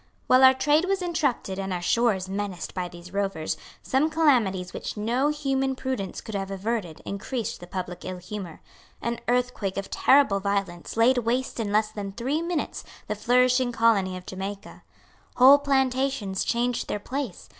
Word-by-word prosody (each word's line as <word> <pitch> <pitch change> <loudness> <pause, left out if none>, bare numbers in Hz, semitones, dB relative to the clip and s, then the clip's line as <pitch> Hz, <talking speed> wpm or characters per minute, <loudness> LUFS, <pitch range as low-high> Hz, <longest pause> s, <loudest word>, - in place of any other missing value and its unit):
While 255 +1 +5
our 260 0 +8
trade 295 +5 +3
was 385 -1 0
interrupted 280 - -1
and 195 0 -3
our 180 - -1
shores 210 -2 +2
menaced 195 -2 -4
by 180 -1 -3
these 175 +1 -12
rovers, 195 -6 -1 0.3
some 275 +4 +2
calamities 235 - +2
which - - -5
no 240 +6 +1
human 270 -3 0
prudence 255 -8 -4
could 220 - -9
have 195 -1 -3
averted 195 -4 -3
increased 230 +3 -4
the 175 - -10
public 180 -1 -5
ill 185 0 -5
humour. 180 -1 -7 0.4
An 235 0 -3
earthquake 245 -6 0
of 195 - -4
terrible 265 -8 +4
violence 195 -2 -2
laid 245 +3 +5
waste 245 +2 -1
in 210 -3 -2
less 215 +1 +2
than 200 -2 -6
three 265 +9 -1
minutes 340 -2 -3 0.2
the 210 - -2
flourishing 250 +3 +3
colony 210 -6 +2
of 180 - -11
Jamaica. 195 +2 -7 0.5
Whole 270 +3 +8
plantations 265 -7 0
changed 240 0 0
their - - -2
place. 255 -2 -5
225 Hz, 165 wpm, -26 LUFS, 195-260 Hz, 0.5 s, our